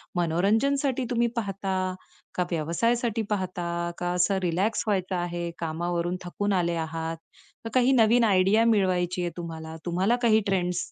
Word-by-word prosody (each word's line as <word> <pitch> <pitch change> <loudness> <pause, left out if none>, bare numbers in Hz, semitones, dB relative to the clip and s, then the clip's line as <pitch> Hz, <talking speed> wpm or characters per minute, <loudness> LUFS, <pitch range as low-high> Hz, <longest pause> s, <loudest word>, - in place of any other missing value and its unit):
मनोरंजनसाठी 225 - +1
तुम्ही 235 -1 +2
पाहता? 190 -3 -2 0.4
का 180 - +1
व्यवसायासाठी 225 +8 0
पाहता? 185 -3 -2 0.4
का 175 0 -1
असं 180 +2 +2
रिलॅक्स 185 +6 0
व्हायचं 190 -2 0
आहे, 175 -1 -3
कामावरून 170 +2 -2
थकून 205 +3 -1
आले 170 -2 +1
आहात? 165 0 -4 0.5
का - - -3
काही 255 0 +4
नवीन 230 +2 +4
आयडिया 200 +2 +4
मिळवायची 180 -2 +1
आहे 175 -1 -2
तुम्हाला? 160 -1 -6
तुम्हाला 185 +6 +2
काही 220 -3 +5
ट्रेंड्स 180 -2 -1
185 Hz, 135 wpm, -26 LUFS, 175-215 Hz, 0.5 s, काही